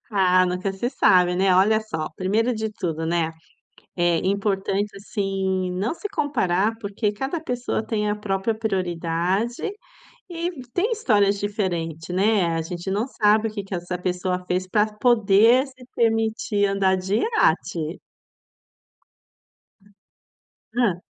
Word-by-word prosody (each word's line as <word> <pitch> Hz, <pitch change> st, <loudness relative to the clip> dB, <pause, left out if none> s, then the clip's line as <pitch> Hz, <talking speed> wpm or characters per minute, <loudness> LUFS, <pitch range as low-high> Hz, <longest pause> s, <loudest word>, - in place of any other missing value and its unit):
Ah, 185 Hz, -3 st, +4 dB
nunca 180 Hz, +2 st, -2 dB
se 215 Hz, +5 st, -2 dB
sabe, 180 Hz, -8 st, +4 dB
né, 190 Hz, 0 st, +3 dB
olha 210 Hz, +4 st, +4 dB
só, 165 Hz, -8 st, -4 dB
primeiro 220 Hz, +6 st, +1 dB
de 220 Hz, -1 st, -3 dB
tudo, 165 Hz, -6 st, -3 dB
né, 165 Hz, -1 st, 0 dB, 0.7 s
é 175 Hz, -2 st, +2 dB
importante, 195 Hz, +1 st, 0 dB
assim, 195 Hz, -2 st, -2 dB
não 195 Hz, -, -1 dB
se 415 Hz, -, -6 dB
comparar, 225 Hz, -, 0 dB
porque 205 Hz, 0 st, -2 dB
cada 270 Hz, +9 st, -3 dB
pessoa 245 Hz, -6 st, -2 dB
tem 210 Hz, -2 st, -1 dB
a 210 Hz, -, -1 dB
própria 205 Hz, +1 st, -1 dB
prioridade, 185 Hz, +1 st, -1 dB, 0.7 s
e 340 Hz, 0 st, -2 dB, 0.2 s
tem 415 Hz, +7 st, 0 dB
histórias 205 Hz, -, +2 dB
diferente, 175 Hz, -6 st, -3 dB
né, 200 Hz, 0 st, +3 dB
a 165 Hz, -, -1 dB
gente 175 Hz, +3 st, -5 dB
não 205 Hz, +5 st, 0 dB
sabe 220 Hz, -3 st, +2 dB
o -, -, -6 dB
que 205 Hz, -2 st, -4 dB
que 195 Hz, 0 st, -7 dB
essa 180 Hz, 0 st, -4 dB
pessoa 180 Hz, 0 st, -2 dB
fez 180 Hz, +1 st, -1 dB
para 210 Hz, +3 st, +2 dB
poder 230 Hz, +2 st, +4 dB
se 260 Hz, -2 st, -15 dB
permitir 225 Hz, -2 st, +1 dB
andar 195 Hz, -1 st, +2 dB
de 190 Hz, +2 st, -1 dB
iate. 170 Hz, -, 0 dB, 2.7 s
Hã. 220 Hz, -8 st, +1 dB
200 Hz, 135 wpm, -23 LUFS, 180-225 Hz, 2.7 s, Ah